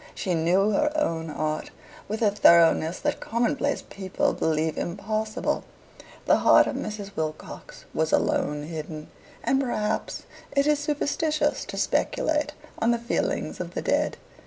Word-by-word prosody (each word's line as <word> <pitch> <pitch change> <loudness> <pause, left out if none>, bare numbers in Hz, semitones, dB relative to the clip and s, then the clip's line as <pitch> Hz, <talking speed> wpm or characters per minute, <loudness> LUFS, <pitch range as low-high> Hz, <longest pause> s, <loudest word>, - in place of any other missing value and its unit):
She 185 - -1
knew 180 +5 +3
her 295 +8 +2
own 165 - -1
heart 155 +1 -2 0.4
with 215 +3 -2
a 210 - +4
thoroughness 170 -3 +5
that - - -1
commonplace 270 +5 0
people 190 -2 -1
believe 160 0 0
impossible. 215 +5 -2 0.6
The - - +5
heart - - +6
of - - -3
Mrs. 205 -2 -5
Wilcox 155 -1 -6
was 160 0 0
alone 145 0 +1
hidden, 155 -1 -7 0.3
and 270 0 +2
perhaps 215 -5 -2 0.3
it 280 0 +4
is 300 -1 +3
superstitious 300 +2 0
to - - -7
speculate 300 - 0 0.3
on 225 - +2
the 240 - +3
feelings 235 +1 -2
of - - -6
the - - -1
dead. - - +1
205 Hz, 140 wpm, -26 LUFS, 160-275 Hz, 0.6 s, heart